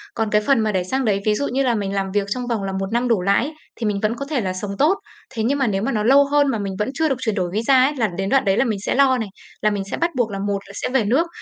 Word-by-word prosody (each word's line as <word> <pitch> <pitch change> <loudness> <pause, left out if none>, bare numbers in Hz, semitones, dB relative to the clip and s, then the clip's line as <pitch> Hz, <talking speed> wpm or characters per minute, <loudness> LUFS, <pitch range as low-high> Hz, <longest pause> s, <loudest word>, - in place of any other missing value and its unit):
Còn 225 -1 -1
cái 210 0 +3
phần 270 +3 +2
mà 220 -1 +1
để 185 -2 0
sang 260 +8 -1
đấy, 200 -2 +1
ví 215 -1 +3
dụ 285 - -1
như 270 +2 0
là 245 -2 +2
mình 200 -2 -2
làm 195 -1 -2
việc 200 0 0
trong 245 +4 -3
vòng 230 -5 -1
là 195 - -3
1 190 0 -2
năm 240 +2 +1
đổ 225 -6 +2
lại 200 +6 +2
ấy, 310 - -6 0.2
thì 230 - -4
mình 205 -1 0
vẫn 215 +2 0
có 280 - -5
thể 285 -6 0
là 185 -3 -2
sống 200 +2 -5
tốt. 320 +8 +4 0.4
Thế 220 - -1
nhưng 270 +5 +1
mà 265 - +2
nếu 195 -1 0
mà 250 - -1
nó 210 -3 0
lâu 275 +4 +6
hơn 290 -1 +4
mà 230 - -1
mình 200 -1 -3
vẫn 210 - 0
chưa 315 +3 +1
được 270 - +1
chuyển 220 -5 -1
đổi 180 -3 -1
visa 255 +4 +4
ấy, 290 - -1
là 230 -5 +1
đến 195 0 -1
đoạn 270 0 +3
đấy 195 0 +2
là - - +3
mình 215 -5 -1
sẽ - - 0
lo 265 -1 +4
này, 220 -4 -4 0.3
là 215 - +3
mình 205 -2 -2
sẽ - - -2
bắt 340 0 0
buộc 240 -4 0
là 195 - -4
một 200 0 -1
là - - -11
sẽ - - -3
về 250 -3 +2
nước, 270 +11 +2
220 Hz, 350 wpm, -21 LUFS, 200-265 Hz, 0.4 s, lâu